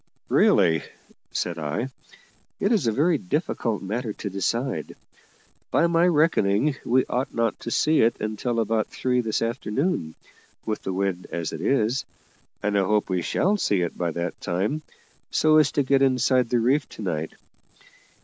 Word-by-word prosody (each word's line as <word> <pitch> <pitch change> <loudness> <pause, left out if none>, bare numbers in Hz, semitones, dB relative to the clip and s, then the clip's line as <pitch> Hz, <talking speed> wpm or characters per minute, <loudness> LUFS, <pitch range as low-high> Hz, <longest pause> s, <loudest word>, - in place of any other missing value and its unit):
"Really," 80 -2 +4 0.5
said 85 -1 -2
I, 80 - -2 0.7
"it 200 - +1
is 205 - +2
a - - +3
very 155 +8 +2
difficult 150 - -2
matter 110 +3 -3
to 100 - -6
decide. 115 +7 -2 0.7
By 170 - +3
my 170 +1 +3
reckoning 150 - +2
we 130 +2 +2
ought 125 +2 -3
not 115 -1 0
to - - -6
see 155 +6 +3
it 115 +1 +3
until 110 +2 -2
about 110 0 0
three 125 -1 0
this 110 -1 -1
afternoon, 115 - -2 0.5
with 110 - -2
the 95 - -3
wind 95 -1 -2
as 85 -2 -3
it 80 - -5
is; 125 +3 +1 0.6
and 105 0 0
I 100 - +4
hope 105 +1 +1
we 90 -1 +1
shall 190 - +1
see 100 - +1
it 85 - -2
by 85 -1 -1
that 85 +1 -4
time, 100 - -1 0.5
so 155 0 +4
as 150 -3 +4
to 145 - +2
get 135 +1 +2
inside 130 -2 +3
the 125 - +2
reef 130 +5 +1
to 110 - -9
night. 80 -4 -3
115 Hz, 165 wpm, -24 LUFS, 100-135 Hz, 0.7 s, Really